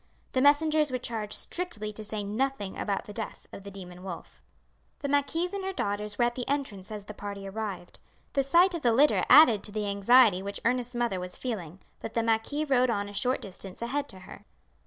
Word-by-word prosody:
The 255 - +1
messengers 300 +1 +4
were 255 - -1
charged 225 -4 -4
strictly 215 - -4
to 215 - -7
say 210 0 -3
nothing 210 -1 -2
about 200 -2 -2
the 210 - -9
death 220 0 -6
of - - -8
the 200 - -8
demon 180 -2 -10
wolf. 185 -3 -9 0.6
The 285 - -2
marquise 305 +6 +1
and 400 -1 -3
her 385 - -2
daughters 205 - -3
were 240 - +4
at 240 - 0
the 245 0 -5
entrance 235 -9 -3
as 210 -2 -6
the 210 - -8
party 200 -1 -7
arrived. 195 -3 -6 0.3
The 275 - +3
sight 345 +7 +4
of 340 - -3
the 235 -4 +3
litter 285 +6 +4
added 250 -7 +8
to 210 - -2
the 210 0 -2
anxiety 200 0 +5
which 200 +1 -5
Ernest's 245 0 0
mother 235 -6 0
was 180 0 -6
feeling; 190 -8 -5 0.2
but 225 - -7
the 230 - +2
marquis 230 +7 0
rode 255 -3 +3
on 205 -3 -1
a - - -10
short 250 +6 0
distance 190 -1 -8
ahead 285 +4 -2
to 185 - -10
her. 200 +2 -12
225 Hz, 215 wpm, -28 LUFS, 200-270 Hz, 0.6 s, added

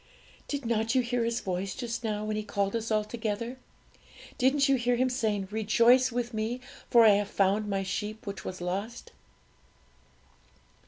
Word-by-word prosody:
Did 285 -3 -4
not 225 +1 0
you 255 - +4
hear 240 0 0
His 230 0 -1
voice 185 0 -3
just 240 -1 -4
now, 215 -1 -2
when 215 0 -2
He 215 - -1
called 200 -1 -1
us 230 0 -2
all 215 -1 +2
together? 225 +2 -4 0.8
didn't 275 +3 +3
you 275 - +4
hear 245 -1 +1
Him 255 +2 +2
saying, 210 -6 -1
'Rejoice 235 +4 +4
with 240 0 -3
Me 220 +3 -2 0.3
for 235 -2 +7
I - - +9
have 205 0 +3
found 200 +2 +1
My 195 -1 -1
sheep 210 +3 -4
which 200 -2 -6
was 185 -1 -6
lost'?" 200 +7 -4
220 Hz, 170 wpm, -29 LUFS, 205-240 Hz, 0.8 s, I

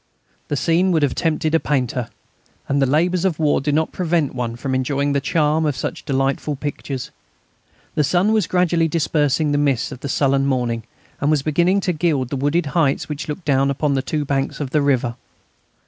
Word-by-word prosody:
The 145 - -1
scene 170 +6 +2
would 160 -4 +2
have 140 - +2
tempted 160 -1 0
a 165 - +5
painter, 125 -5 -1 0.6
and 140 0 +1
the 135 - +3
labours 170 +6 +2
of 185 -5 +1
war 150 -3 +2
do 145 +2 0
not 155 +2 +1
prevent 165 -5 0
one 120 -2 -3
from 130 +2 -3
enjoying 140 +2 0
the 140 - +1
charm 155 +1 +1
of 150 -3 0
such - - -4
delightful 135 +2 0
pictures. 135 -2 -5 0.8
The 150 - +2
sun 180 +8 +2
was 215 -2 +2
gradually 175 -2 +2
dispersing 150 -2 +1
the 145 - +1
mist 140 -4 +1
of - - -8
the 140 - -5
sullen 135 0 +2
morning, 120 -4 -1 0.3
and 145 - +1
was 150 -3 +2
beginning 175 +6 +2
to 180 - 0
gild 150 -6 0
the 140 - -3
wooded 145 +5 +1
heights 145 -2 +1
which 150 +2 -5
look 160 +4 -5
down 135 -1 +2
upon 140 +1 0
the 135 - +1
two 150 +2 -2
banks 135 -1 -1
of 140 -3 -4
the 150 - +2
river. 125 -4 +1
145 Hz, 200 wpm, -20 LUFS, 135-160 Hz, 0.8 s, a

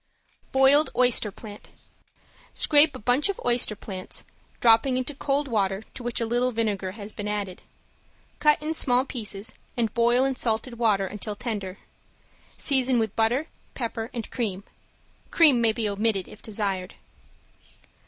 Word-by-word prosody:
~BOILED 270 +3 +5
OYSTER 245 -4 +3
PLANT~ 205 +1 -11 0.9
Scrape 300 0 +4
a - - -5
bunch 250 - +1
of 400 - -3
oyster 240 -3 +2
plants, 190 -3 -8 0.4
dropping 240 +3 +4
into 255 +3 -2
cold 280 +1 -1
water 200 -4 0
to - - -8
which 240 0 -3
a 230 - 0
little 245 +2 +1
vinegar 205 -5 -2
has 210 0 -9
been 210 - -5
added. 200 -3 -4 0.8
Cut 300 -1 +4
in 315 +1 -1
small 255 -4 +3
pieces 215 -5 -5 0.2
and 225 -3 0
boil 240 +2 +3
in 270 -1 0
salted 235 0 -1
water 210 -4 +2
until 210 +2 -5
tender. 205 -4 -4 0.8
Season 260 -3 +3
with 220 -3 -1
butter, 235 +7 +1 0.3
pepper 230 -2 -4
and 235 -3 -5
cream. 200 -6 -3 0.7
Cream 295 -8 +5
may 225 -1 +4
be 220 -1 -2
omitted 205 -1 0
if 210 - -14
desired. 200 -4 -3
230 Hz, 145 wpm, -25 LUFS, 210-255 Hz, 0.9 s, ~BOILED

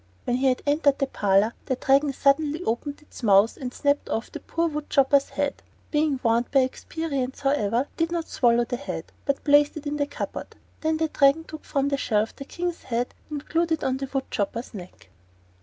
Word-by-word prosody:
When 245 - +1
he 265 +1 +2
had 255 -1 +1
entered 285 -1 +3
the 275 - +1
parlor 205 -3 +2
the 260 - +1
Dragon 275 +3 +3
suddenly 290 +4 +2
opened 285 +5 -3
its 300 - -13
mouth 205 -1 +5
and 255 -2 -5
snapped 285 +2 0
off 225 - -2
the - - -6
poor 335 +1 -1
wood 300 -2 -5
chopper's 275 0 +4
head. 285 -1 -2 0.3
Being 295 -3 +1
warned 230 +1 +2
by 275 - +4
experience, 270 0 -3
however, 245 -5 +2
it 280 - -9
did 330 0 0
not 340 -2 -1
swallow 240 -1 +3
the 245 +1 -3
head, 285 - -6
but 280 -1 -1
placed 290 +1 +4
it 305 - -8
in 295 0 -2
the 285 -1 0
cupboard. 285 - -6 0.2
Then 315 0 0
the 320 0 +1
Dragon 280 +3 +4
took 315 -1 -10
from 280 0 0
a 280 - +1
shelf 215 -4 0
the 275 - -8
King's 350 +3 -4
head 245 -1 -2 0.2
and 295 -2 -5
glued 335 +1 0
it 320 - -2
on 260 0 0
the 270 0 -5
wood 270 -1 -1
chopper's 230 +5 -3
neck. 185 -3 -10
275 Hz, 210 wpm, -25 LUFS, 245-295 Hz, 0.3 s, mouth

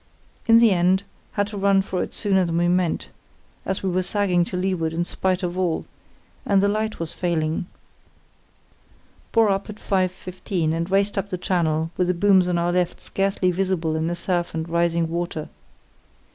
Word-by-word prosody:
In 230 0 +7
the 230 -2 +6
end 185 +1 +3 0.3
had 205 - +1
to 205 -1 -6
run 195 0 +3
for 185 -1 -2
it - - -5
sooner 195 -3 +2
than 170 -1 -1
we 175 0 +2
meant, 180 -1 0 0.6
as 190 - -2
we 190 - 0
were 185 +1 +1
sagging 185 -2 +2
to 180 - -5
leeward 180 -4 -1
in 170 +1 -1
spite 185 +1 -1
of 180 +1 -2
all, 175 -3 0 0.6
and 200 -1 +3
the 200 - +3
light 215 +1 -1
was 165 -1 -4
failing. 165 -1 -1 1.6
Bore 225 -2 +4
up 195 +1 -2
at 210 - -6
5.15, 185 -3 -1
and 165 +2 -2
raced 200 +1 +2
up 200 - -4
the 185 - -3
channel 165 -3 0
with 180 - +1
the 180 - +1
booms 190 0 +4
on 175 -1 +1
our 170 +1 +1
left 180 0 0
scarcely 195 -1 0
visible 180 -3 -1
in 160 +1 -1
the 175 - -1
surf 175 -1 -1
and 160 0 -3
rising 170 0 +1
water. 170 -2 -4
180 Hz, 185 wpm, -23 LUFS, 170-195 Hz, 1.6 s, In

